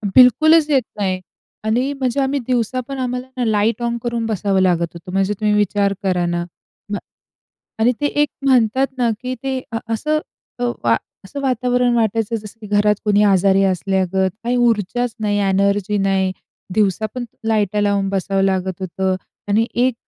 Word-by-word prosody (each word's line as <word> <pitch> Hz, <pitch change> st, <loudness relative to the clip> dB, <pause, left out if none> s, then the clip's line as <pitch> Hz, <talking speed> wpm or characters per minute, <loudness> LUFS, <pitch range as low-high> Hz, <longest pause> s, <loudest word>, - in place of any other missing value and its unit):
बिलकुलच 300 Hz, +6 st, +6 dB
येत 275 Hz, -3 st, +4 dB, 0.2 s
नाही 185 Hz, -2 st, 0 dB, 0.4 s
आणि 240 Hz, +6 st, +1 dB
म्हणजे 255 Hz, +1 st, 0 dB
आम्ही 275 Hz, +1 st, 0 dB
दिवसापण 255 Hz, +2 st, -1 dB
आम्हाला 250 Hz, 0 st, -3 dB
ना, 250 Hz, -, 0 dB
लाइट 220 Hz, +1 st, +1 dB
ऑन 235 Hz, 0 st, -1 dB
करून 235 Hz, -1 st, -2 dB
बसावं 200 Hz, -3 st, 0 dB
लागत 175 Hz, -2 st, +2 dB
होतं, 170 Hz, +2 st, -10 dB
म्हणजे 195 Hz, +2 st, +1 dB
तुम्ही 210 Hz, -1 st, +2 dB
विचार 205 Hz, -1 st, +2 dB
करा 180 Hz, -2 st, +1 dB
ना. 175 Hz, 0 st, -1 dB, 0.5 s
म्ह 205 Hz, -, -1 dB, 0.8 s
आणि 230 Hz, +3 st, +4 dB
ते 290 Hz, -, +2 dB
एक 295 Hz, 0 st, +1 dB, 0.2 s
म्हणतात 260 Hz, 0 st, +3 dB
ना 240 Hz, -2 st, +2 dB
की 255 Hz, 0 st, -3 dB
ते 265 Hz, -1 st, -2 dB
अ, 225 Hz, -, -1 dB
असं 305 Hz, +7 st, 0 dB, 0.4 s
अ, 245 Hz, -, -5 dB, 0.2 s
वा 115 Hz, -1 st, +4 dB, 0.3 s
असं 280 Hz, +9 st, -7 dB
वातावरण 250 Hz, -2 st, +1 dB
वाटायचं 225 Hz, 0 st, 0 dB
जसं 210 Hz, 0 st, -10 dB
की 215 Hz, -, -8 dB
घरात 210 Hz, 0 st, +4 dB
कोणी 210 Hz, -1 st, +3 dB
आजारी 195 Hz, 0 st, +4 dB
असल्यागत, 190 Hz, 0 st, +1 dB
काही 245 Hz, +1 st, +1 dB
ऊर्जाच 235 Hz, 0 st, +1 dB
नाही, 205 Hz, -1 st, 0 dB
एनर्जी 200 Hz, +1 st, +1 dB
नाही, 195 Hz, -1 st, +1 dB, 0.4 s
दिवसा 210 Hz, 0 st, +1 dB
पण 250 Hz, -1 st, -3 dB, 0.2 s
लाइट 210 Hz, -2 st, +1 dB
लावून 200 Hz, -1 st, +1 dB
बसावं 195 Hz, 0 st, 0 dB
लागत 190 Hz, -1 st, 0 dB
होतं 190 Hz, +1 st, -1 dB, 0.3 s
आणि 215 Hz, +3 st, +3 dB
एक 250 Hz, +1 st, +2 dB
210 Hz, 165 wpm, -19 LUFS, 195-245 Hz, 0.8 s, बिलकुलच